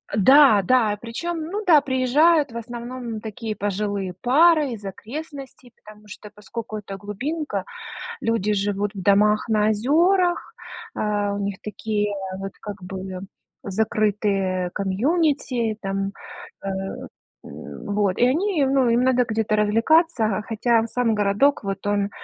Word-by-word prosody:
Да, 260 +1 +6
да, 220 -2 +2
причём, 330 +9 -4
ну 420 +3 -3
да, 320 -4 +7
приезжают 285 +3 +3
в 235 - -7
основном 235 -1 -6
такие 220 0 -5
пожилые 200 -2 -2
пары 300 +2 +4
из 215 -3 -7
окрестностей, 265 +4 -8
потому 215 0 -14
что 210 +1 -11
поскоку 215 +2 -7
это 200 -2 -7
глубинка, 270 +11 -4 0.6
люди 225 -2 0
живут 205 0 -1
в 195 - -5
домах 210 +3 +3
на 215 -1 +2
озёрах, 340 - +2 0.4
а, 205 -1 -1
у - - -3
них 200 -1 -3
такие, 210 -1 -2 0.3
вот 195 0 -6
как 205 -2 -8
бы, 185 0 -6 0.4
закрытые 200 -3 0
комьюнити 240 - 0
там, 195 0 -2 0.5
э, - - -5 0.8
м, - - -10
вот. 205 -2 0
И 245 - +5
они 330 +3 +1
ну 265 -2 +2
им 235 +2 +3
надо 255 -1 +3
где-то 220 -1 0
развлекаться, 220 - +2
хотя 230 0 +1
сам 235 -1 0
городок, 210 +8 +2
вот 195 0 -4
он 205 -1 +1
220 Hz, 130 wpm, -23 LUFS, 205-260 Hz, 0.8 s, да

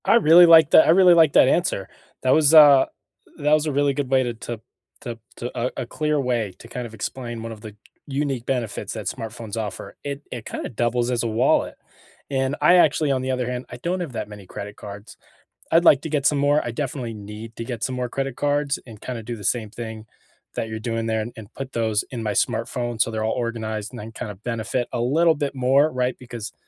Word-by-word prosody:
I - - +5
really 175 -5 +8
like 165 -3 +7
that - - +7
I - - +7
really 180 0 +7
like 160 -4 +5
that - - +6
answer. 135 - 0 0.3
That 130 - +3
was 155 -1 +4
a 145 -4 +8 0.5
that 150 +1 +1
was 155 0 +3
a 155 - -1
really 140 0 +2
good 140 -2 -3
way 130 -1 +3
to 120 -1 -3
to 115 0 -7 0.4
to 115 -1 -7 0.2
to 120 - -5
a 125 +2 -1
a - - -8
clear 150 +4 -1
way 120 -7 -1
to - - -12
kinda 120 0 -6
explain 120 +1 -5
one 115 - -6
of 110 -2 -10
the 105 -1 -10 0.3
unique 135 -3 -2
benefits 120 -6 -3
that 110 -2 -6
smartphones 115 -2 -6
offer. 105 -2 -6
It 140 0 -5
it 120 -3 -6
kinda - - -5
doubles 120 +1 0
as 120 -2 0
a - - 0
wallet. 115 +2 +1 0.5
And 135 0 0
I 180 - +6
actually, 155 -3 +3
on 130 -1 0
the 130 0 -2
other 125 -1 -1
hand, 125 0 -4
I - - -8
don't 175 +8 -2
have 165 -8 -5
that 110 -2 -4
many 105 -2 -11
credit 100 +2 -8
cards. 100 +1 -10 0.5
I'd 165 +1 +5
like 140 -4 +6
to 160 - -4
get 145 -3 0
some 145 - +2
more, 145 +1 +2
I - - -4
definitely 125 -2 -4
need 105 +2 -9
to - - -4
get 120 -2 -5
some 130 - -2
more 125 -1 -3
credit 135 -1 -3
cards, 145 0 0
and 110 -4 -13
kinda 120 -3 -5
do 120 +2 -5
the 105 - -11
same 110 0 -1
thing 110 -1 -8 0.5
that 110 - -3
you're 110 0 -5
doing 115 0 -3
there 110 0 0
and 115 +3 -6
and 110 0 -11
put 135 -1 -7
those 110 -2 0
in 120 -3 -5
my 105 - -1
smartphone 120 0 -1
so 115 - +1
they're 110 -1 -2
all 110 - 0
organized 110 -3 -3
and 125 - -9
then 110 +2 -8
kinda 105 -2 -6
benefit 115 +3 -3
a 120 - -1
little 160 +7 +3
bit 145 -2 -3
more, 135 +4 +3
right? 125 -1 -1
Because, 120 -3 -8
125 Hz, 235 wpm, -23 LUFS, 110-140 Hz, 0.5 s, really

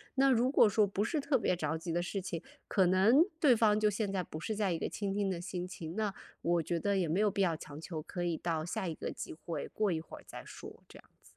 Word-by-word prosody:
那 270 0 +5
如 250 0 +3
果 275 - +6
说 210 +1 +3
不 200 +1 -1
是 295 +8 0
特 280 -1 +2
别 180 - +1
着 160 -1 -1
急 165 +1 -5
的 170 +1 +1
事 190 +2 -3
情， 170 -3 -5 0.2
可 190 -2 +3
能 210 - +6 0.2
对 270 -7 +6
方 215 -1 +4
就 215 0 +4
现 205 -1 -2
在 190 -2 0
不 155 - -7
是 215 +6 -3
在 200 -3 +1
一 - - -1
个 - - -2
倾 200 -2 -3
听 200 -1 0
的 180 -3 -2
心 175 +1 -4
情， 170 -1 -7
那 215 -2 -1 0.3
我 170 0 +2
觉 170 +2 -1
得 200 +2 +1
也 175 -3 +1
没 170 +6 +1
有 210 -1 +3
必 200 - -1
要 170 -4 +2
强 145 -1 -9
求， 165 -1 -5
可 175 +3 -5
以 170 -2 0
到 160 -1 -2
下 175 +1 -3
一 160 - -3
个 - - -4
机 - - -6
会， 160 -1 -5
过 215 -1 0
一 160 -2 -1
会 - - -11
儿 - - -14
再 - - -8
说， - - -11
这 - - -12
样 - - -20
子。 - - -36
190 Hz, 305 characters per minute, -33 LUFS, 170-210 Hz, 0.3 s, 果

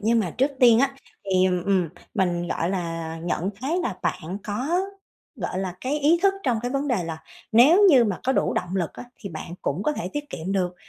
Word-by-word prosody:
Nhưng 230 +2 +3
mà 180 -5 -2
trước 270 +3 +3
tiên 235 -2 +7
á 275 0 +1 0.3
thì, 185 -1 +3
ừm, 180 -1 0
ừm, 190 -4 +2 0.3
mình, 175 -3 0
gọi 170 +3 -1
là, 165 -3 -3
nhận 175 +2 -1
thấy 310 +7 0
là 215 - -3
bạn 180 +3 -3
có, 265 - 0 0.6
gọi 185 -2 -3
là, 185 -2 -3
cái 285 +4 -1
ý 315 +4 +4
thức 390 0 +4
trong 245 -5 +1
cái 245 - -2
vấn 275 +2 -1
đề 215 -10 0
là, 160 -1 -6 0.3
nếu 290 - +7
như 250 -5 +6
mà 200 -4 -2
có 265 - +2
đủ - - +1
động 180 +2 -2
lực 175 -4 -1
á - - -9 0.2
thì 200 - -6
bạn 170 +1 -7
cũng 155 +8 -1
có 300 - +1
thể 180 - -4
tiết 290 0 -5
kiệm 180 +5 -4
được. 180 -2 0
195 Hz, 230 wpm, -24 LUFS, 175-265 Hz, 0.6 s, tiên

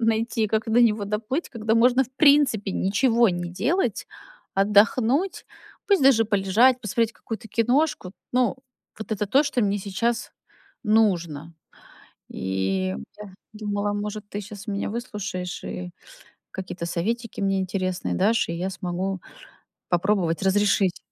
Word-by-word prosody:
найти, 225 0 +1
как 215 +1 0
до 240 +2 +4
него 215 -3 +3
доплыть? 215 - -2
Когда 225 -2 -1
можно, 250 +3 +4
в 250 - -20
принципе, 280 -9 +4
ничего 230 +5 +2
не 175 -1 -3
делать, 255 - -1 0.5
отдохнуть, 225 - +2 0.4
пусть 395 -8 +4
даже 230 -5 +6
полежать, 215 +5 +3
посмотреть 230 +1 0
какую-то 225 0 -8
киношку. 230 -2 +1 0.2
Ну, 250 +1 +2 0.4
вот 220 - -8
это 210 -1 -1
то, 275 +8 +4
что 280 -4 -1
мне 205 -1 +1
сейчас 230 +5 -2 0.5
нужно. 170 -8 +1 0.8
И 95 0 -2 0.2
я 205 -3 -10 0.2
думала, 205 -1 -2
может, 210 0 -4
ты 205 - -4
щас 205 +1 -10
меня 200 -1 -2
выслушаешь 205 -6 -5
и 180 -1 -6 0.6
какие-то 185 -2 -6
советики 220 +7 -3
мне 195 -1 +1
интересные 185 -1 -2
дашь, 215 +2 +2
и - - -2
я 180 +3 -2
смогу 185 0 -3 0.7
попробовать 175 -2 +1
разрешить. 195 -1 +2
210 Hz, 130 wpm, -24 LUFS, 190-230 Hz, 0.8 s, даже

